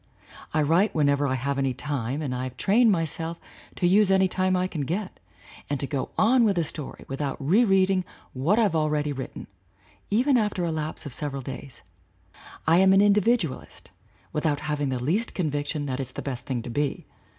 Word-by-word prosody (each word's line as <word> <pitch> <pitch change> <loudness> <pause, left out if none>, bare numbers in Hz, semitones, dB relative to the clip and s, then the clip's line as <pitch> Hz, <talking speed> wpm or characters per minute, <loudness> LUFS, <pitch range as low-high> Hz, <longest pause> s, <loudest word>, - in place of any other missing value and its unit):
I 155 -1 +2
write 170 +8 +2
whenever 145 -2 +2
I 130 - 0
have 140 +2 -2
any 135 -2 0
time 140 0 -2
and 135 -3 -2
I 125 +1 -3
have 130 -1 -8
trained 225 - +4
myself 165 -1 -1 0.4
to - - -1
use 195 +3 +4
any 190 0 +4
time 185 0 +1
I 180 0 +1
can 170 -5 -4
get 180 +8 -3 0.5
and 145 -1 -1
to 140 - -2
go 135 -1 -3
on 240 +3 +4
with 200 -4 +2
a 170 - +2
story 150 -2 -7
without 135 0 -3
re 175 - +3
reading 190 -3 +3 0.3
what 150 - +1
I've 210 -7 +2
already 150 -1 0
written, 130 -1 -7 0.6
even 250 +6 +3
after 210 -5 0
a 165 - -1
lapse 155 0 -4
of 140 - -6
several 140 -3 -4
days. 135 +1 -9 0.8
I 165 +2 +5
am 190 +1 +6
an 195 - +6
individualist 205 - 0 0.4
without 150 -2 0
having 145 -2 -1
the 130 - -1
least 170 - -1
convic 145 -5 -1
tion 150 -2 -3
that 130 -1 -3
it's 130 -2 -5
the - - -6
best 130 -3 -5
thing 125 -4 -2
to 120 - -6
be. 145 +3 -2
155 Hz, 195 wpm, -26 LUFS, 140-190 Hz, 0.8 s, am